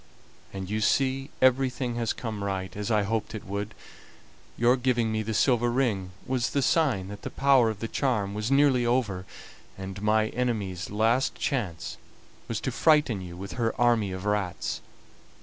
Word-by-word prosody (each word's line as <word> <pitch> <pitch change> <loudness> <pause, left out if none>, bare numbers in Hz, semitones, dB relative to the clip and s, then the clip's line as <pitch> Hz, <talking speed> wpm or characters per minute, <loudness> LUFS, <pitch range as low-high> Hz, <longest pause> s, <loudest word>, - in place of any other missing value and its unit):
And 95 -1 -5
you 105 +2 -2
see 135 +4 +1
everything 130 -1 +2
has 115 -1 0
come 110 -4 -4
right, 95 -2 -3
as 105 +1 -3
I 105 -2 +3
hoped 110 +1 -2
it 105 - -7
would. 100 +2 -4 0.8
Your 120 +2 +4
giving 120 -3 +1
me 110 0 0
the 110 0 -3
silver 120 -1 +3
ring 115 -7 0 0.2
was 130 -2 0
the 140 - 0
sign 130 - +2
that 100 0 -8
the - - -5
power 135 -4 +4
of 110 -2 -5
the 115 - -2
charm 110 -7 0
was 105 +2 -2
nearly 135 -2 +4
over, 115 -7 0 0.5
and 95 +1 -7
my 110 +1 +2
enemy's 105 -7 -2
last 115 +5 +2
chance 100 - -3 0.5
was - - -2
to - - -2
frighten 150 -10 +3
you 90 -1 -8
with 100 +2 -7
her 115 -1 0
army 115 -5 +3
of 95 +1 -6
rats. 105 -3 -1
110 Hz, 170 wpm, -27 LUFS, 100-125 Hz, 0.8 s, Your